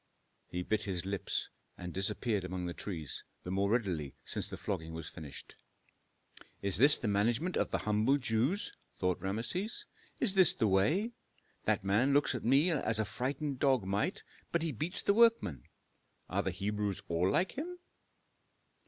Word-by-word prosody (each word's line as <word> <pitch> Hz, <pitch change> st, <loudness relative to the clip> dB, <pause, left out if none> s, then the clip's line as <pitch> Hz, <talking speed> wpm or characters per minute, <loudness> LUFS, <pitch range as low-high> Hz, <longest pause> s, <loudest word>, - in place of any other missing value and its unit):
He 90 Hz, 0 st, -4 dB
bit 110 Hz, +2 st, 0 dB
his 95 Hz, -3 st, -2 dB
lips, 100 Hz, 0 st, -2 dB, 0.3 s
and 90 Hz, -1 st, -7 dB
disappeared 105 Hz, +1 st, 0 dB
among 90 Hz, 0 st, -4 dB
the 85 Hz, -, -3 dB
trees, 80 Hz, -7 st, -5 dB, 0.2 s
the 90 Hz, -, -5 dB
more 100 Hz, +1 st, +1 dB
readily 95 Hz, -, -1 dB
since -, -, 0 dB
the -, -, -6 dB
flogging 80 Hz, -6 st, -4 dB
was 80 Hz, -1 st, -6 dB
finished. 75 Hz, -5 st, -9 dB, 1.1 s
"Is 100 Hz, -2 st, 0 dB
this 140 Hz, +6 st, +8 dB
the 115 Hz, -, -3 dB
management 115 Hz, -, +1 dB
of -, -, +1 dB
the -, -, 0 dB
humble 105 Hz, +6 st, +3 dB
Jews?" 130 Hz, -, 0 dB, 0.2 s
thought 90 Hz, -2 st, 0 dB
Rameses. 115 Hz, -, -2 dB, 0.3 s
"Is 225 Hz, -7 st, +3 dB
this 185 Hz, -4 st, +6 dB
the 110 Hz, -, +2 dB
way? 150 Hz, -, +2 dB, 0.5 s
That -, -, +1 dB
man 115 Hz, +8 st, +3 dB
looks 145 Hz, -1 st, +3 dB
at 125 Hz, -, -4 dB
me 140 Hz, +9 st, +4 dB
as 135 Hz, -8 st, +1 dB
a 110 Hz, -, +1 dB
frightened 135 Hz, +5 st, -3 dB
dog 130 Hz, -6 st, +3 dB
might, 100 Hz, +2 st, -1 dB, 0.3 s
but 170 Hz, -1 st, +1 dB
he 165 Hz, -, -1 dB
beats 155 Hz, -, 0 dB
the 200 Hz, -, +3 dB
workmen. 225 Hz, -, +3 dB, 0.6 s
Are -, -, 0 dB
the -, -, -1 dB
Hebrews 100 Hz, +1 st, -2 dB
all 85 Hz, +2 st, +1 dB
like 180 Hz, -, +2 dB
him?" 350 Hz, +6 st, -5 dB
105 Hz, 165 wpm, -33 LUFS, 95-140 Hz, 1.1 s, this